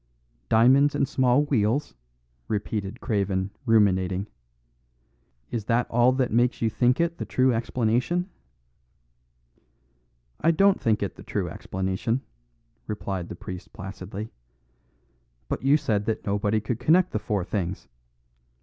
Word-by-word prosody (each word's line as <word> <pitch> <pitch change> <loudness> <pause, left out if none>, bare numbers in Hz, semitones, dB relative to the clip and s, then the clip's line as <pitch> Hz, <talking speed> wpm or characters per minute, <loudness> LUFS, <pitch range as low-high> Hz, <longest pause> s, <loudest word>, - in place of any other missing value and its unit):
"Diamonds 135 +6 +5
and 140 - +1
small 130 0 +3
wheels," 135 -1 0 0.5
repeated 105 +1 -3
Craven 100 -3 -1 0.2
ruminating. 95 -3 +3 1.3
"Is 115 -4 -3
that 115 +2 +2
all 120 +2 +4
that 130 -1 0
makes 120 +2 +2
you 115 -1 +1
think 125 +4 +2
it 170 0 0
the - - -2
true 130 0 +2
explanation?" 120 +9 0 2.1
"I 165 - +2
don't 195 +4 +4
think 110 -2 +1
it 100 - -4
the - - -11
true - - -2
explanation," 95 +6 -2 0.7
replied 95 -4 -4
the - - -6
priest 90 +1 -9
placidly; 100 +1 -7 1.2
"but - - -3
you 140 +3 +4
said 110 -9 -1
that 110 - -2
nobody 105 +1 +1
could 110 +2 -3
connect 165 +8 +3
the 105 - -1
four 105 -2 -1
things. 95 -3 -3
110 Hz, 125 wpm, -25 LUFS, 100-130 Hz, 2.1 s, Diamonds